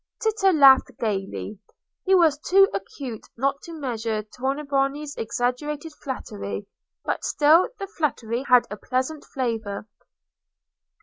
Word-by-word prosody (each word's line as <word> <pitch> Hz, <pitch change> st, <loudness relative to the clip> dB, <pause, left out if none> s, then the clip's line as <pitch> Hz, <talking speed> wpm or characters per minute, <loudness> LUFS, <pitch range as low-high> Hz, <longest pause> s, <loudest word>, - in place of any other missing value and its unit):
Tito 425 Hz, -3 st, +2 dB
laughed 275 Hz, -5 st, +7 dB
gaily. 205 Hz, -1 st, -3 dB, 0.5 s
He 385 Hz, 0 st, +5 dB
was 320 Hz, -5 st, +4 dB
too 390 Hz, +5 st, +5 dB
acute 220 Hz, +4 st, -6 dB
not 275 Hz, +3 st, 0 dB
to 335 Hz, -, -10 dB
measure 230 Hz, -7 st, -3 dB
Tornabuoni's 275 Hz, +4 st, -2 dB
exaggerated 285 Hz, +7 st, -2 dB
flattery, 100 Hz, -, -6 dB, 0.4 s
but -, -, -2 dB
still 310 Hz, +8 st, +4 dB
the 395 Hz, -, -4 dB
flattery 255 Hz, -, -2 dB
had 250 Hz, -1 st, +6 dB
a 210 Hz, -, -5 dB
pleasant 260 Hz, +7 st, -2 dB
flavour. 225 Hz, -5 st, -3 dB
270 Hz, 115 wpm, -24 LUFS, 225-300 Hz, 0.5 s, laughed